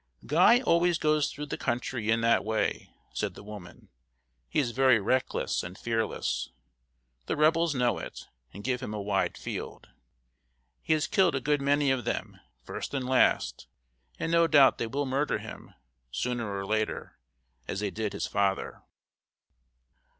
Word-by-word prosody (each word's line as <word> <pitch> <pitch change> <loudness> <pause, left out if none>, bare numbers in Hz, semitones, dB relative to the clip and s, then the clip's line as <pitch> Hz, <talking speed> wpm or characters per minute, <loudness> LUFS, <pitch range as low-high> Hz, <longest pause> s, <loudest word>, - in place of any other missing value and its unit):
"Guy 185 - +5
always 170 -6 +3
goes 150 -2 +2
through 150 +1 -6
the 145 - -5
country 120 -1 -2
in 115 0 +3
that 115 0 +3
way," 110 +1 -1 0.2
said - - -3
the - - -11
woman. 100 -4 -11 0.6
"He - - -3
is 130 -5 +2
very 130 -1 +4
reckless 130 +6 0
and 90 +3 -8
fearless. 110 - -2 0.8
The - - 0
Rebels 160 +1 +3
know 125 -2 +1
it, - - -8 0.3
and 100 - -10
give 125 +1 -1
him 105 - -5
a - - -3
wide 100 -1 -1
field. - - -6 0.9
He - - +1
has 155 -1 +1
killed 185 -6 +3
a - - +1
good 145 +2 0
many 140 0 +2
of 130 -2 0
them, - - -4 0.2
first - - -6
and 130 -2 -2
last, 130 - +2 0.5
and 165 - -2
no 170 0 +4
doubt 140 -4 +6
they 115 - -1
will 140 +5 -2
murder 135 +3 0
him, - - -10 0.3
sooner 115 - -2
or 100 0 -3
later, 110 +1 -2 0.5
as 95 - -3
they 105 -2 -1
did 110 -2 -3
his 100 - -2
father." 100 -1 -1
125 Hz, 160 wpm, -28 LUFS, 105-145 Hz, 0.9 s, doubt